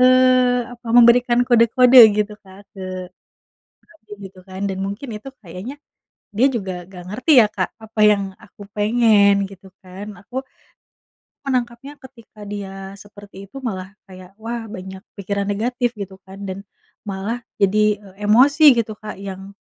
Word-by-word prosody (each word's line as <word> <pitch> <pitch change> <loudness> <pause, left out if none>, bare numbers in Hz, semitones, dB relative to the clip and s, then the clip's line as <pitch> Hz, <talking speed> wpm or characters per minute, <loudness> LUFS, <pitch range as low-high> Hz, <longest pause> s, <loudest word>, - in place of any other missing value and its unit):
eee, 255 -1 +4
apa, 240 0 -15
memberikan 240 0 +5
kode-kode 245 +1 +5 0.2
gitu 210 0 -1
Kak, 190 0 -15
ke 195 - -12 1.0
suami, 320 -10 -27 0.2
gitu 185 - -21
kan. 190 0 -9
Dan 190 -1 -4
mungkin 205 +8 -6
itu 210 +5 -9
kayaknya 185 +8 -8 0.6
dia 255 +5 +5
juga 195 -5 -3 0.2
enggak 180 -2 -11
ngerti 255 - -1
ya, - - +4
Kak, 185 -2 -1 0.2
apa 220 0 -9
yang 200 -1 +1 0.2
aku 210 -1 -18
pengen, 210 -2 +3
gitu 195 -1 -15 0.2
kan. 185 +2 -9 0.2
Aku 255 +6 -5 1.0
menangkapnya 255 0 -3
ketika 245 -5 -17
dia 200 -1 -6 0.2
seperti 205 0 -15
itu - - -14
malah 190 -4 -4 0.2
kayak, 185 -1 -13
"wah, 230 +1 -5
banyak 190 -2 -9 0.2
pikiran 200 +1 -3
negatif" 240 +4 -1
gitu 195 -1 -7
kan. 190 +1 -13
Dan 190 +1 -6 0.4
malah 205 +4 -5 0.2
jadi, 210 +1 +2
e 200 0 -16
emosi, 275 +8 +6
gitu 220 -2 -2
Kak, 210 -1 -9
yang 195 0 -8
210 Hz, 145 wpm, -20 LUFS, 195-240 Hz, 1.0 s, emosi